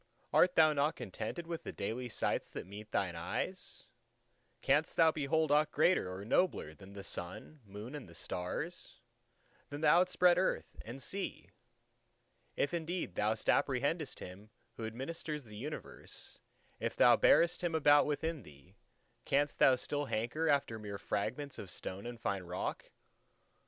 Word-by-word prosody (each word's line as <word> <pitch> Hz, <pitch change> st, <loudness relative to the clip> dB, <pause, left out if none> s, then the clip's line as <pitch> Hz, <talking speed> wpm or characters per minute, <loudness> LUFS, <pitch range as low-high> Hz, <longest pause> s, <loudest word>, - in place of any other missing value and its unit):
art 180 Hz, 0 st, +5 dB
thou 155 Hz, -1 st, +6 dB
not 145 Hz, +2 st, +1 dB
contented 170 Hz, -, -5 dB
with 165 Hz, -1 st, -4 dB
the -, -, -6 dB
daily 120 Hz, +5 st, -4 dB
sights -, -, -1 dB
that -, -, -6 dB
meet 105 Hz, +3 st, -10 dB
thine 90 Hz, -5 st, 0 dB
eyes? 135 Hz, -, -4 dB, 0.8 s
canst -, -, +2 dB
thou 160 Hz, -1 st, +6 dB
behold 155 Hz, +1 st, +1 dB
aught 150 Hz, +1 st, +4 dB
greater 155 Hz, -, +3 dB
or 95 Hz, +2 st, -6 dB
nobler 115 Hz, -, +1 dB
than 95 Hz, +6 st, -13 dB
the 100 Hz, -1 st, -8 dB
Sun, 90 Hz, -, -5 dB
Moon, 105 Hz, +6 st, -8 dB
and 90 Hz, -, -8 dB
Stars; 115 Hz, -, -4 dB, 0.7 s
than 145 Hz, +1 st, -6 dB
the -, -, +3 dB
outspread 180 Hz, 0 st, +5 dB
Earth 190 Hz, -, -1 dB
and 125 Hz, +4 st, -7 dB
Sea? 195 Hz, +9 st, -4 dB, 1.0 s
If 145 Hz, -, 0 dB
indeed 170 Hz, -, -2 dB
thou 105 Hz, +3 st, +1 dB
apprehendest 140 Hz, +7 st, +1 dB
Him 95 Hz, +4 st, -9 dB, 0.3 s
who 110 Hz, -, -4 dB
administers 150 Hz, +5 st, -4 dB
the 105 Hz, -3 st, -12 dB
universe, 145 Hz, +8 st, -7 dB, 0.4 s
if -, -, -2 dB
thou -, -, +7 dB
bearest 170 Hz, +1 st, +4 dB
Him 170 Hz, -2 st, 0 dB
about 145 Hz, -2 st, +6 dB
within 155 Hz, +1 st, -1 dB
thee, 85 Hz, -, -17 dB, 0.5 s
canst 145 Hz, +1 st, +1 dB
thou 130 Hz, -, +7 dB
still 145 Hz, +3 st, -2 dB
hanker 130 Hz, +8 st, -1 dB
after 140 Hz, -6 st, +1 dB
mere 105 Hz, -2 st, -5 dB
fragments 125 Hz, +8 st, -3 dB
of 95 Hz, -, -7 dB
stone 95 Hz, +4 st, -5 dB
and 120 Hz, -1 st, -7 dB
fine 100 Hz, -4 st, -1 dB
rock? 90 Hz, 0 st, -4 dB
135 Hz, 150 wpm, -34 LUFS, 100-160 Hz, 1.0 s, thou